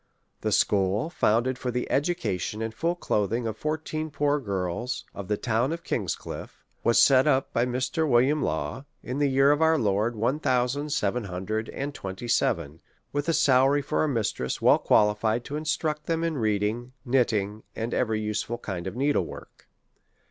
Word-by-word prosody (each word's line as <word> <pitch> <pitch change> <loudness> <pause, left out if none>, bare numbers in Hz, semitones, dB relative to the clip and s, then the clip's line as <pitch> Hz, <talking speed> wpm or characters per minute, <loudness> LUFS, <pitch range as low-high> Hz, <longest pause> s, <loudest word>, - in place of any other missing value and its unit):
The - - -2
school, 100 - +2
founded 125 -2 +1
for 125 - -3
the 125 0 -2
education 135 - -1
and 110 0 -4
full 165 +9 -1
clothing 115 - -1
of 110 -2 -2
fourteen 155 +3 -3
poor 145 0 +1
girls 100 +1 -3
of 100 -2 -7
the 105 - 0
town 120 +4 0
of 170 +1 -4
King's - - -1
Cliffe, - - -9 0.2
was 115 - +4
set 135 0 +6
up 135 -2 +2
by 120 +2 +2
Mr. 130 +6 -1
Wm. 130 +5 +3
Law, 80 - -2 0.2
in 130 +3 -4
the 145 -1 +3
year 135 +1 +4
of 145 +2 +1
our 160 0 +4
Lord, 110 -1 +1
one 120 +7 0
thousand 130 +3 0
seven 125 -5 0
hundred 100 +5 -3
and 140 +1 -4
twenty 95 0 -6
seven, 80 -9 0 0.3
with 145 +3 -1
a - - +3
salary 135 0 +4
for 155 - 0
a 155 - +1
mistress 110 - -1
well - - +5
qualified 110 +3 +2
to 145 - -5
in 155 +1 -4
struct 155 -1 -1
them 165 0 -1
in 165 -1 0
reading, 110 +3 -1
knitting, 110 -5 +1
and 115 +2 -3
.every 110 -3 +1
useful 105 +2 -2
kind 95 -5 -5
of 95 - -5
needle 140 +3 +1
work. - - -12
125 Hz, 180 wpm, -26 LUFS, 105-145 Hz, 0.3 s, set